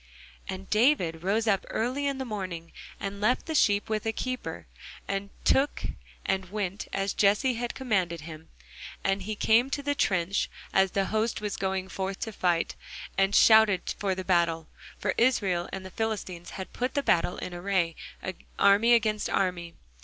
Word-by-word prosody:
And 190 0 -5
David 210 - +2
rose 205 +5 +1
up 200 -4 +2
early 255 +5 -1
in 275 -1 -1
the 265 - -3
morning, 185 -7 -5 0.3
and 200 0 -5
left 245 +5 +2
the 320 - -3
sheep 205 -9 +3
with 215 -1 -1
a - - +2
keeper, 255 +3 -4 0.4
and 200 0 -2 0.2
took, 275 +2 +2 0.4
and 190 -1 -1
went, 200 -1 -3
as 195 0 -1
Jesse 210 +6 +3
had 240 +1 -3
commanded 190 -10 0
him; 155 0 -10 0.5
and 195 0 +1
he 215 +3 -4
came 230 +5 +3
to 285 +1 -3
the 285 +1 +1
trench, 190 -6 +1 0.2
as 190 0 +4
the 195 -1 +1
host 220 +1 +1
was 210 -2 -3
going 190 -1 -2
forth 190 +1 -4
to 225 - -3
the - - -16
fight, 175 -2 +1 0.4
and 195 +1 +2
shouted 220 -4 +6
for 195 -2 0
the 185 0 -5
battle. 170 -3 +1 0.3
For - - -1
Israel 195 -8 +2
and 190 -1 -6
the 190 - -8
Philistines 195 -6 -3
had 190 - -7
put 250 +1 -2
the 285 - +1
battle 175 -4 +2
in 180 - -5
array, 175 -2 0 0.6
army 205 +4 +5
against 215 -2 +1
army. 180 -3 -1
200 Hz, 175 wpm, -28 LUFS, 185-225 Hz, 0.6 s, shouted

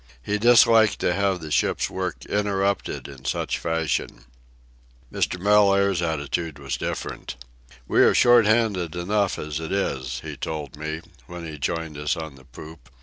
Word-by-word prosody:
He 105 +8 -1
disliked 115 -1 +6
to 90 - +2
have 95 -2 0
the 80 -1 -7
ship's - - +1
work - - -4
interrupted 100 -1 -1
in 65 -2 -12
such 65 - -2
fashion. 80 -6 -2 0.9
Mr. 90 - -1
Mellaire's 100 -2 +4
attitude 80 -1 -2
was 70 -2 -4
different. - - -5 0.5
"We - - +3
are - - +5
short 120 -3 +6
handed 105 -7 +1
enough 100 +3 0
as 75 0 -4
it 80 0 -6
is," 65 -11 -2
he - - -7
told 75 -4 -5
me, 80 +2 -5 0.3
when 85 -1 -8
he 75 -2 -8
joined 80 +1 -3
us 75 +3 -1
on 80 -3 -6
the 65 -1 -17
poop. 75 +5 -13
85 Hz, 155 wpm, -24 LUFS, 75-100 Hz, 0.9 s, disliked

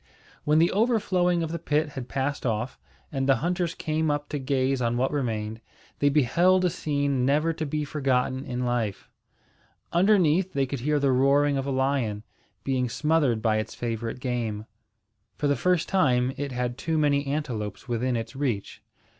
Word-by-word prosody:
When 150 +1 +3
the 165 +2 +4
overflowing 185 -6 +2
of 160 - -3
the 170 - -3
pit 150 -1 0
had 135 -4 -7
passed 140 +1 -2
off, 120 +1 -2 0.3
and 135 -1 -1
the 135 - +6
hunters 175 +1 -1
came 155 0 -1
up 145 0 -2
to 145 - -3
gaze 135 -1 0
on 120 0 0
what 130 +2 +1
remained, 110 -5 -2 0.4
they 145 - +4
beheld 175 +7 +3
a 180 - +2
scene 140 -4 -1
never 150 +5 +2
to 160 -1 -4
be 150 +1 -2
forgotten 130 -2 0
in 125 -2 -3
life. 120 -5 -2 0.8
Underneath, 185 -1 +3
they 140 -1 +1
could 135 0 -4
hear 150 +4 +1
the 140 -1 +2
roaring 140 +2 +3
of 135 0 -2
a - - -1
lion, 130 -6 0 0.4
being 130 -2 0
smothered 145 -4 +1
by 110 -2 +2
its 110 +1 -4
favourite 115 0 -4
game. 115 -4 -3 0.7
For - - -2
the 145 0 +3
first 180 +5 +1
time, 130 -8 +2
it 145 -1 -4
had 125 0 -3
too 160 +2 -1
many 145 -2 +2
antelopes 125 -8 -3
within 120 +1 0
its 115 +1 -4
reach. 125 -8 -3
140 Hz, 175 wpm, -26 LUFS, 125-155 Hz, 0.8 s, the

